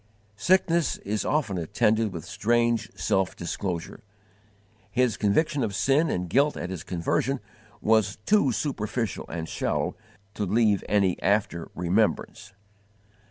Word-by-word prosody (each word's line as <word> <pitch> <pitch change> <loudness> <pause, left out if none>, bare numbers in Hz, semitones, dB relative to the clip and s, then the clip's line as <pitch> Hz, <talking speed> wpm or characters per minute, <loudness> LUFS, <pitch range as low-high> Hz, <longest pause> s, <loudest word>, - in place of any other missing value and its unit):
Sickness 170 - +2
is 105 +1 -3
often 115 - 0
attended 105 +6 +1
with 85 -4 -7
strange 115 0 +1
self 95 -4 0
disclosure. 85 0 -4 0.9
His 120 +1 +1
conviction 140 +8 +1
of 105 -4 -2
sin 140 +10 +2
and 90 0 -2
guilt 140 - +2
at 90 - -4
his 90 -4 -5
conversion 95 +11 -1 0.4
was 110 -2 +3
too 205 -11 +4
superficial 115 -3 -2
and 80 0 -4
shallow - - -1 0.4
to 105 - -3
leave 105 0 +2
any 100 -3 +2
after 100 -4 0
remembrance. 100 +2 0
105 Hz, 120 wpm, -26 LUFS, 95-125 Hz, 0.9 s, too